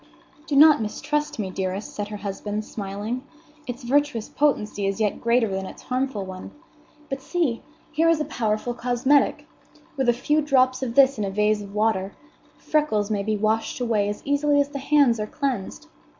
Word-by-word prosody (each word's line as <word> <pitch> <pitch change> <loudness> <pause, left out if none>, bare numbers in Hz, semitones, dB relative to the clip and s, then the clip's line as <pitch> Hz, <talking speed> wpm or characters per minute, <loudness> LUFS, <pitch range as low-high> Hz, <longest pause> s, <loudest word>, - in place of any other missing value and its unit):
"Do 290 - -1
not 300 -2 +7
mistrust 295 +7 -2
me, 195 -4 -3
dearest," 190 +2 -4
said 205 -1 -4
her 210 0 -6
husband, 205 +1 -4
smiling; 210 +5 -5 0.4
"its 245 +1 -6
virtuous 265 -3 +1
potency 210 -9 0
is 195 +2 -2
yet 210 -2 0
greater 235 0 +3
than 190 -1 -3
its - - -11
harmful 255 -5 -2
one. 185 0 -8 0.6
But 270 0 -4
see! 285 -6 -1 0.3
here 325 +1 +3
is 330 -2 +3
a 305 - -1
powerful 220 +1 -1
cosmetic. 250 +4 +2 0.5
With 265 -2 +2
a - - +5
few 295 +6 +1
drops 260 -3 +2
of 240 -3 -3
this 275 -3 +5
in - - 0
a 195 - -1
vase 210 +1 +1
of 200 0 -10
water, 210 -3 0 0.4
freckles 220 -9 0
may 205 -2 0
be 215 +1 -1
washed 220 +3 0
away 220 -4 +1
as 205 - -5
easily 285 +1 +2
as 285 0 +2
the 285 -1 -5
hands 275 -4 +3
are 210 - -2
cleansed. 275 -9 -3
235 Hz, 180 wpm, -24 LUFS, 210-280 Hz, 0.6 s, not